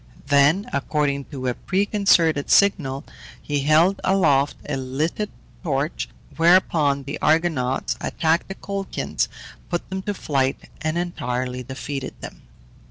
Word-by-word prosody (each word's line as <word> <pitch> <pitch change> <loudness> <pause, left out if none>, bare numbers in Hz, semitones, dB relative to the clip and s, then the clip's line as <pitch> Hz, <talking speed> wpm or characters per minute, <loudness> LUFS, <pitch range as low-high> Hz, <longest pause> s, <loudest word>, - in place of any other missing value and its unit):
Then, 150 - +4
according 140 -1 0
to 135 -3 -7
a 125 - +1
preconcerted 185 - +2
signal, 145 -9 +3 0.4
he 145 -1 -2
held 155 +7 +3
aloft 145 -8 +3
a 150 - -1
lighted 145 +10 -2 0.3
torch, 150 -2 -2 0.3
whereupon 165 -5 +4
the 140 +3 -5
Argonauts 155 -5 +1
attacked 160 +1 0
the 195 - -6
Colchians, 200 0 -3 0.4
put 175 -1 -2
them 190 0 -2
to 205 +1 -3
flight, 135 -6 0 0.2
and 155 +1 -1
entirely 125 -7 -2
defeated 130 +1 -5
them. - - -9
150 Hz, 120 wpm, -23 LUFS, 135-175 Hz, 0.4 s, Then